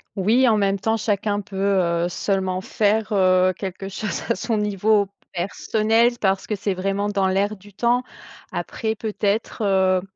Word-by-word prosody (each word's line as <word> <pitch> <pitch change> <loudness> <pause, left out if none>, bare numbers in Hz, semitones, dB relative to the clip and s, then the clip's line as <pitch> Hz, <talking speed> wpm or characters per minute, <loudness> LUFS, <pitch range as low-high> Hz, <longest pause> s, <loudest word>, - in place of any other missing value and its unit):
Oui, 225 +7 +3
en 220 -2 +4
même 200 -1 +1
temps, 225 +3 +1
chacun 205 -1 -1
peut, 200 -1 -12 0.5
heu, - - 0
seulement 185 0 -1
faire, 215 +2 0
heu, 185 -1 +4
quelque 195 0 -5
chose 205 +2 -4
à 230 - +2
son 225 -3 -1
niveau 210 0 +2 0.3
personnel 220 +6 +1
parce 190 -1 +1
que - - -3
c'est 200 0 -2
vraiment 195 +2 -1
dans 195 -2 +1
l'air 200 +3 +1
du 200 +1 -17
temps. 240 +4 +1 0.5
Après 220 -1 -3
peut-être, 215 0 -2
heu, 190 -2 +3
205 Hz, 160 wpm, -22 LUFS, 190-220 Hz, 0.5 s, en